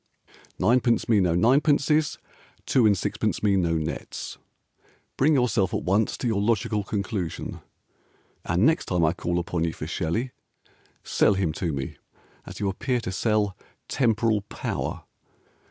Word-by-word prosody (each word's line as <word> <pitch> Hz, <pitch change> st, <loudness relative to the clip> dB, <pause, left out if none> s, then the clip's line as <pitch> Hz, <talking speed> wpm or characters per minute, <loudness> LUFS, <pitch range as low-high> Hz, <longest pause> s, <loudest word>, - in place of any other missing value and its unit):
Ninepence 120 Hz, -1 st, +2 dB
me 110 Hz, -3 st, +4 dB
no 90 Hz, -3 st, +2 dB
ninepences, 145 Hz, -, +3 dB, 0.5 s
Two 125 Hz, -4 st, +4 dB
and 100 Hz, -2 st, +3 dB
sixpence -, -, -2 dB
me 100 Hz, -2 st, +3 dB
no 85 Hz, -3 st, +1 dB
nets, 80 Hz, 0 st, -5 dB, 0.8 s
Bring 150 Hz, +3 st, +3 dB
yourself 115 Hz, -7 st, +1 dB
at -, -, -2 dB
once 100 Hz, +4 st, +1 dB
To -, -, -5 dB
your 105 Hz, -3 st, +1 dB
logical 105 Hz, -1 st, +1 dB
conclusion, 100 Hz, -4 st, -4 dB, 0.8 s
And 90 Hz, +6 st, +1 dB
next 160 Hz, +2 st, +3 dB
time 90 Hz, -3 st, +2 dB
I 80 Hz, -, +2 dB
call 85 Hz, 0 st, -2 dB
upon 85 Hz, -1 st, -1 dB
you 85 Hz, -1 st, -1 dB
For -, -, -6 dB
Shelley, 110 Hz, +11 st, -2 dB, 0.7 s
Sell 105 Hz, -, +3 dB
him 95 Hz, -5 st, 0 dB
to 85 Hz, +1 st, -2 dB
me, 70 Hz, -2 st, -5 dB, 0.5 s
As -, -, -8 dB
you 100 Hz, -, 0 dB
appear 125 Hz, +6 st, -1 dB
to 95 Hz, -, -4 dB
sell 105 Hz, 0 st, 0 dB, 0.3 s
"Temporal 115 Hz, -3 st, +1 dB
Power." 100 Hz, -, -4 dB
105 Hz, 145 wpm, -25 LUFS, 90-120 Hz, 0.8 s, me